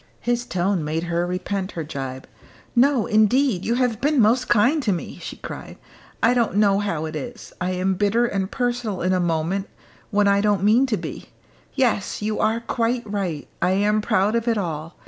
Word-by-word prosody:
His 240 0 0
tone 185 -2 0
made 155 +2 -2
her 170 0 -1
repent 185 +2 -3
her 165 - -4
gibe. 135 -3 -6 0.5
"No, 255 -1 +4
indeed, 215 -1 +3
you 235 - 0
have 245 -3 0
been 290 0 +2
most 230 +3 +3
kind 250 +8 +4
to 220 - +1
me," 175 - -4
she - - -7
cried. - - -8 0.5
"I 240 - +5
don't 235 -5 +1
know 200 -1 +4
how 170 -7 -2
it 155 0 -6
is. 240 +7 -7
I 180 +1 0
am 185 +1 0
bitter 205 +5 +2
and 195 -5 -2
personal 240 -7 -2
in 185 +1 +2
a 185 - +2
moment 175 +3 -1 0.4
when 205 -1 +2
I 200 0 +4
don't 205 -2 +1
mean 230 +6 +4
to 220 -4 0
be. 170 - -7 0.5
Yes! 245 -7 0
you 210 +1 -2
are 225 +2 +1
quite 235 +1 -1
right. 195 -8 -3
I 185 - +2
am 210 +2 +2
proud 205 0 +1
of 230 0 -1
it 230 -2 +2
all. 165 -3 -4
205 Hz, 195 wpm, -23 LUFS, 180-235 Hz, 0.5 s, I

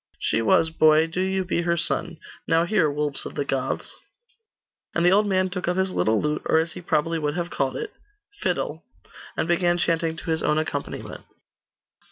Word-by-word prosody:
'She 115 - 0
was, 160 +8 +3
boy. 155 0 +5
Do 165 +3 -3
you 190 0 0
be 170 -1 0
her 170 0 0
son. 170 +1 -1 0.3
Now 165 0 +3
hear, 175 -5 +2
Wolves 145 -1 0
of - - -8
the 140 - -1
Goths!' 135 -2 -2 1.0
And 170 - +2
the 175 - +6
old 205 +2 +4
man 185 -1 +2
took 180 -2 -3
up 180 +1 0
his 190 0 +1
little 110 -10 +2
lute, 150 0 -1
or - - +3
as 160 0 0
he - - -7
would 175 - -16
probably 150 -1 0
have 175 +1 -3
called 135 -1 -1
it, 440 - -5 0.5
'fidel,' - - -2 0.5
and - - 0
began 175 0 +2
chanting 165 -1 0
to 165 - -4
his 160 - 0
own 150 0 +1
accompaniment. 150 -2 -4
165 Hz, 195 wpm, -24 LUFS, 150-180 Hz, 1.0 s, the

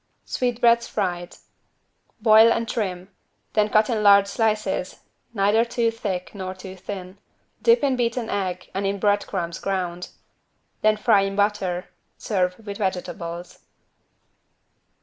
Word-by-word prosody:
=Sweetbreads 235 -1 +2
fried.= 175 -4 -3 0.9
Boil 220 0 +7
and 230 0 0
trim. 190 -6 -3 0.4
Then 210 -1 +2
cut 215 +1 +4
in 225 -3 -1
large 200 -1 +7
slices, 210 -3 -1 0.4
neither 210 +1 +3
too 235 -1 0
thick 195 -5 -4
nor 190 -2 -5
too 185 0 -9
thin. 190 0 -8 0.4
Dip 465 -8 +4
in 270 -2 +2
beaten 240 -1 -1
egg 185 -3 -3
and 195 +1 -1
in 200 +1 -1
bread 205 0 +1
crumbs 170 -3 -4
ground. 180 -2 -3 0.7
Then 215 0 +3
fry 200 -1 +4
in 195 0 -2
butter. 195 -3 0 0.3
Serve 180 -3 -1
with 200 -1 -6
vegetables. 180 -3 -4
200 Hz, 130 wpm, -23 LUFS, 185-220 Hz, 0.9 s, Boil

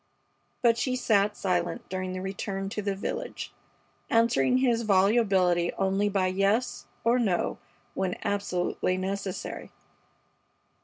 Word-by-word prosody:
But 230 -1 +4
she 255 -1 0
sat 210 -4 +2
silent 175 -2 -1
during 185 0 -3
the 185 0 -4
return 195 0 -4
to 210 - -3
the 200 -1 -1
village, 195 - -5 0.6
answering 230 - +3
his 245 -3 +2
volubility 195 -4 +3
only 195 +1 +1
by 195 -2 +1
yes 195 +6 0 0.2
or 235 +2 +3
no 195 -7 0 0.3
when 185 -1 -1
absolutely 185 -2 -1
necessary. 190 0 -4
195 Hz, 115 wpm, -28 LUFS, 185-220 Hz, 0.6 s, But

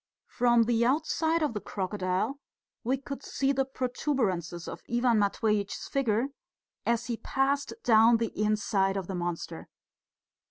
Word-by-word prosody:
From 240 -1 +4
the 235 0 +2
outside 315 +5 +1
of 295 - 0
the 210 - -4
crocodile 190 +6 -2 0.4
we 255 +4 +1
could 275 +1 -7
see 275 0 0
the 270 -1 +1
protuberances 240 - -2
of - - -7
Ivan 240 -2 +3
Matveitch's 205 0 0
figure 250 -1 +1 0.6
as 235 0 +1
he 235 -1 -3
passed 275 +3 0
down 225 0 +6
the 230 -1 -3
inside 210 -2 +1
of 190 - -3
the 190 - -5
monster. 175 -2 -4
230 Hz, 135 wpm, -29 LUFS, 200-265 Hz, 0.6 s, down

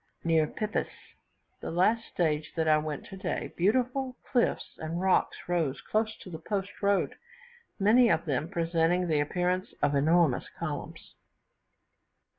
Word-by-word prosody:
Near 160 -2 +3
Pipis, 215 +5 -2 0.7
the - - -5
last 215 +7 +2
stage 155 -3 -1
that 160 -1 0
I 155 0 +5
went 150 -2 -5
today, 190 -2 -4
beautiful 250 +7 +1
cliffs 245 -3 0
and 160 +2 -3
rocks 190 0 +2
rose 160 -6 0
close 220 +5 -1
to 185 - -10
the 160 - -6
post 195 +3 -4
road, 200 -1 +2 0.7
many 230 +5 +5
of - - +2
them 150 +1 -1
presenting 170 +1 +1
the 155 -3 +2
appearance 180 +5 -1
of 145 0 +3
enormous 155 -1 +3
columns. - - -6
175 Hz, 135 wpm, -29 LUFS, 155-200 Hz, 0.7 s, I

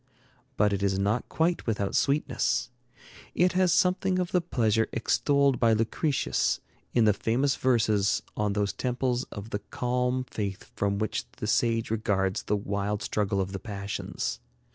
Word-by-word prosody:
But 105 -1 +3
it 100 - -1
is 95 -1 +1
not 105 +5 0
quite 170 -2 0
without 100 -3 -1
sweetness. 140 -4 +1 0.6
It 180 +1 +4
has 185 -1 +3
something 185 +1 +2
of 180 -1 -1
the 180 - +3
pleasure 115 -9 +1
extolled 140 +2 +2
by 115 -2 +4
Lucretius 115 +6 0 0.3
in 120 -2 +3
the 105 - +5
famous 130 +7 +1
verses 105 -7 +2
on 105 -1 0
those 100 0 0
temples 125 0 -1
of 105 +2 -9
the 105 - -1
calm 125 +4 -1
faith 100 -6 -4
from 100 0 0
which 110 0 -2
the - - -6
sage 115 -2 +1
regards 95 -3 0
the 105 - 0
wild 100 +1 -2
struggle 100 -2 0
of 95 0 -1
the 95 - -4
passions. 100 -1 -4
110 Hz, 155 wpm, -28 LUFS, 100-130 Hz, 0.6 s, the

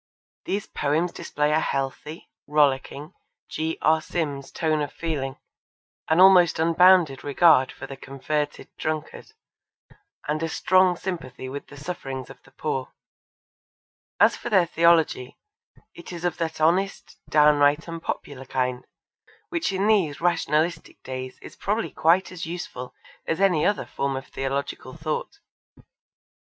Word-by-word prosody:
These 200 +1 -2
poems 155 +4 -1
display 150 -2 -1
a 155 - +3
healthy, 140 +3 -4 0.2
rollicking, 145 +1 +1 0.4
G. 160 +1 -2
R. 160 +1 +4
Sims 145 -5 -4
tone 155 -2 0
of 145 - -3
feeling, 145 -5 -3 0.7
an 160 +2 +3
almost 185 -3 +7
unbounded 170 -3 +4
regard 145 -2 +4
for 135 - -9
the 135 - -8
converted 145 +2 -3
drunkard, 155 - -4 0.9
and 150 +1 -1
a 165 - -1
strong 185 +2 +3
sympathy 150 -10 -6
with 140 +2 -7
the 145 - -13
sufferings 135 -5 -6
of 135 - -15
the - - -21
poor. 135 -1 -4 1.3
As - - +5
for - - -6
their 190 -6 +4
theology, 165 -6 +2 0.6
it 170 - -11
is 175 0 -6
of 175 -1 -1
that 160 -2 -3
honest, 180 +5 0
downright 150 0 +4
and 165 -1 -6
popular 135 -4 -5
kind, 125 -1 -2 0.6
which 335 - -1
in 195 +1 0
these 195 -9 +2
rationalistic 165 -1 0
days 130 0 -6
is - - -11
probably 215 +3 -2
quite 175 +4 +2
as 180 -2 -6
useful 165 -7 -7 0.3
as 165 - -1
any 185 -6 +3
other 205 - 0
form 140 -1 -2
of 135 +1 -5
theological 135 0 -4
thought. 155 - -4
155 Hz, 135 wpm, -25 LUFS, 140-175 Hz, 1.3 s, almost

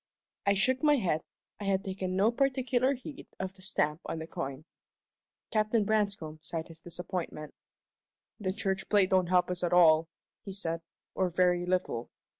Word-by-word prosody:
I 200 - +5
shook 255 +7 +2
my 295 -1 +5
head. 175 - +1 0.4
I 205 - -5
had 195 -1 +1
taken 185 -1 -3
no 205 +4 +4
particular 260 0 +2
heed 265 +3 -9
of 190 0 -3
the 190 - -17
stamp 150 -5 0
on - - -3
the 160 - -5
coin. 135 -2 -5 0.9
Captain 215 0 +2
Branscome 200 -7 0
sighed 160 0 -4
his 165 0 -11
disappointment. 175 -3 -5 0.9
"The 190 -3 -1
church 195 -1 -2
plate 200 -3 +4
don't 185 -2 +4
help 180 0 +3
us 180 0 -4
at 175 - +1
all," 165 -2 +6 0.4
he 195 - -6
said, 165 -4 -2 0.3
"or 185 -1 +1
very 180 0 +2
little. 180 -10 -1
185 Hz, 165 wpm, -30 LUFS, 170-205 Hz, 0.9 s, all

